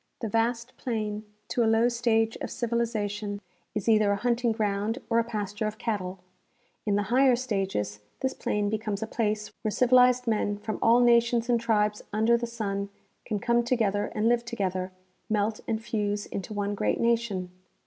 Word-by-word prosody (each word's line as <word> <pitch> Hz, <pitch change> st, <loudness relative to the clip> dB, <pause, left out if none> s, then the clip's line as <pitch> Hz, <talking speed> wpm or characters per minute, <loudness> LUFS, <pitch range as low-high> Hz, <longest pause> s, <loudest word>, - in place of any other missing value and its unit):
The 225 Hz, -, -2 dB
vast 235 Hz, +3 st, 0 dB
plain, 215 Hz, -3 st, -3 dB, 0.2 s
to 240 Hz, -, +1 dB
a 220 Hz, -, +3 dB
low 225 Hz, +1 st, +4 dB
stage 230 Hz, -2 st, +1 dB
of -, -, -5 dB
civilization, 215 Hz, -4 st, -2 dB, 0.4 s
is 210 Hz, -1 st, -3 dB
either 215 Hz, -2 st, +4 dB
a -, -, +2 dB
hunting 240 Hz, +2 st, +1 dB
ground 215 Hz, +1 st, -1 dB
or 230 Hz, -, +4 dB
a -, -, +3 dB
pasture 210 Hz, -2 st, -3 dB
of 215 Hz, +1 st, -5 dB
cattle; 195 Hz, -6 st, -3 dB, 0.7 s
in 205 Hz, -, +3 dB
the 205 Hz, -, +1 dB
higher 260 Hz, -1 st, +5 dB
stages, 195 Hz, -, -2 dB, 0.2 s
this 265 Hz, -, 0 dB
plain 210 Hz, -1 st, -1 dB
becomes 215 Hz, -1 st, -2 dB
a -, -, -1 dB
place 215 Hz, -2 st, -2 dB
where 215 Hz, -, -1 dB
civilized 250 Hz, +2 st, +4 dB
men 210 Hz, -2 st, 0 dB
from 215 Hz, +1 st, -4 dB
all 235 Hz, +2 st, +5 dB
nations 235 Hz, 0 st, +4 dB
and 240 Hz, -1 st, +3 dB
tribes 210 Hz, -2 st, +1 dB
under 220 Hz, +3 st, +3 dB
the 235 Hz, 0 st, -1 dB
sun 200 Hz, -4 st, -3 dB, 0.4 s
can 215 Hz, -, -1 dB
come 235 Hz, +3 st, +2 dB
together 215 Hz, -4 st, 0 dB
and 215 Hz, +1 st, +1 dB
live 235 Hz, 0 st, +3 dB
together, 190 Hz, -6 st, -2 dB, 0.4 s
melt 215 Hz, 0 st, 0 dB
and 225 Hz, -1 st, -2 dB
fuse 205 Hz, -2 st, -1 dB
into 195 Hz, +1 st, -6 dB
one 205 Hz, -1 st, -1 dB
great 205 Hz, -, 0 dB
nation. 230 Hz, -6 st, 0 dB
220 Hz, 175 wpm, -27 LUFS, 205-235 Hz, 0.7 s, higher